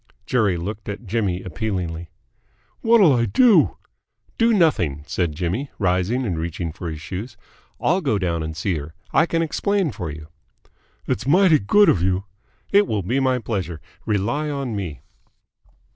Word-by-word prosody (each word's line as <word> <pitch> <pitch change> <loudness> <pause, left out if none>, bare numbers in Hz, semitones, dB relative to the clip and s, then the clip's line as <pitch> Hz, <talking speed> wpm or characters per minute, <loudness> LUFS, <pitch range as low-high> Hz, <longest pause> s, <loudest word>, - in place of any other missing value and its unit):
Jerry 105 -8 +2
looked 105 +5 -5
at 100 +3 -6
Jimmy 100 -4 -1
appealingly. 85 -2 -4 0.7
"What'll 225 -9 +6
I 120 -2 +2
do?" 220 - +4 0.6
"Do 230 0 +4
nothing," 90 - +2
said 80 -2 -1
Jimmy, 95 - -2
rising 95 +6 +1
and 90 -7 -2
reaching 85 0 -3
for 85 +1 -6
his 80 -1 -6
shoes. 100 +8 -7 0.4
"I'll 185 +5 +2
go 135 - +1
down 85 -4 -1
and 80 0 -5
see 85 0 -1
her. 75 +3 -9 0.2
I 160 - +4
can 165 0 +1
explain 190 +1 0
for 95 -7 -5
you." 75 +1 -8 0.8
"It's 105 - -2
mighty 175 0 +5
good 205 - +4
of 85 - +3
you." 95 +1 +1 0.5
"It 200 0 +5
will 105 -3 -1
be 120 +9 -1
a 130 -2 +2
pleasure. 95 -8 -3 0.3
Rely 115 +9 0
on 135 -6 -3
me." 85 -10 -5
100 Hz, 160 wpm, -22 LUFS, 85-140 Hz, 0.8 s, What'll